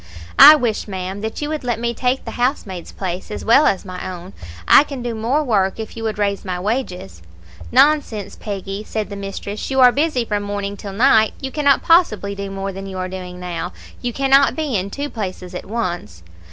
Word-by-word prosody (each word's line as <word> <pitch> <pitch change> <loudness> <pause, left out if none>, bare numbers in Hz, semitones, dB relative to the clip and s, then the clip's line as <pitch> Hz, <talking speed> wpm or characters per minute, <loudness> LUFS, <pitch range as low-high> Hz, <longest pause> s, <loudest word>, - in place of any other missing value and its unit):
"'I 300 +2 +12
wish, 235 -8 -1
ma'am, 190 0 -5
that 220 +6 -4
you 295 - -2
would 310 -2 -3
let 240 -2 -1
me 235 0 -1
take 250 +2 -1
the - - -5
housemaid's 240 - -2
place, 185 -1 -5
as 210 - -6
well 270 +7 +6
as 195 +1 0
my 185 0 -6
own; 180 +1 -9 0.3
I - - +8
can 275 -4 -7
do 240 -1 -3
more 235 +7 0
work 200 -6 +1
if 220 - -6
you 225 - -7
would 215 -1 -2
raise 200 -1 -1
my 180 -2 -3
wages.' 180 - -3 0.5
"'Nonsense, 260 -7 +2
Peggy,' 200 0 -5
said 215 -1 -4
the - - -5
mistress, 200 +1 -6
'you 265 0 0
are 250 -1 +8
busy 285 -3 0
from 210 -2 -1
morning 205 0 -4
till 200 -1 -8
night; 220 0 +4
you 265 -1 -5
cannot 285 -2 +2
possibly 225 - +3
do 200 0 -5
more 195 0 -4
than 195 +1 -7
you 190 -1 -7
are 185 0 -2
doing 180 -1 -7
now. 175 -1 -5 0.3
You 245 - -2
cannot 275 +2 +3
be 305 -6 -2
in 195 0 -1
two 285 +7 -4
places 185 -7 -6
at 180 - -6
once.' 175 - -4
210 Hz, 210 wpm, -20 LUFS, 190-250 Hz, 0.5 s, I